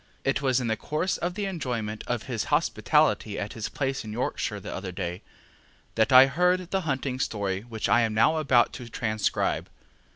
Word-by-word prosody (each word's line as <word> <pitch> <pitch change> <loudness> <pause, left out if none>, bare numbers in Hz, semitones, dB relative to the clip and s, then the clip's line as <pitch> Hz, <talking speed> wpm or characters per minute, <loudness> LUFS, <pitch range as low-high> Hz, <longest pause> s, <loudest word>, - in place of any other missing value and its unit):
It 135 - 0
was 130 -2 +2
in 125 - -3
the 110 -1 +1
course 155 +10 -2
of 175 +1 -3
the 205 -1 -2
enjoyment 120 - -3
of 120 -2 -2
his 120 -5 -3
hospitality 150 -7 +2
at 105 - -4
his 110 -2 -4
place 135 -1 -2
in 110 - -7
Yorkshire 105 -2 -2
the - - -7
other 95 -1 -5
day 90 +1 -4 0.7
that 110 +4 +2
I 130 +1 +10
heard 180 +5 +1
the 195 - +1
hunting 135 -4 -2
story 100 -5 -1
which 110 -1 -4
I 120 - +4
am 110 -2 0
now 135 +8 +4
about 130 -6 +3
to 120 -1 -8
transcribe. 110 -2 -1
125 Hz, 190 wpm, -27 LUFS, 110-150 Hz, 0.7 s, I